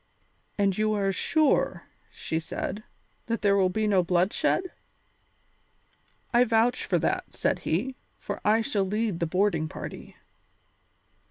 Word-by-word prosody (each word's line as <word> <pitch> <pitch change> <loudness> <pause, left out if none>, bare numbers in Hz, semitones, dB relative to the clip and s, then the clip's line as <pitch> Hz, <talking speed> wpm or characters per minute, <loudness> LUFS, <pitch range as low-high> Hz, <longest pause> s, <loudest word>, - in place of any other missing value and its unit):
"And 200 -2 +2
are - - -10 0.3
you 195 - +2
sure," 310 +9 +1 0.3
she 160 - -3
said, 200 +5 -5 0.4
"that 230 -2 -2
there 200 -1 +4
will 190 -2 +3
be 215 +4 -1
no 200 -3 +3
bloodshed?" 185 - +1 1.7
"I 240 +1 +6
vouch 230 +1 +2
for - - +1
that," - - -2
said - - 0
he, 240 +11 -1 0.2
"for - - -6
I 220 +2 +4
shall 210 -2 0
lead 210 -1 -1
the 170 - 0
boarding 175 -3 +1
party." - - -8
205 Hz, 135 wpm, -27 LUFS, 185-225 Hz, 1.7 s, I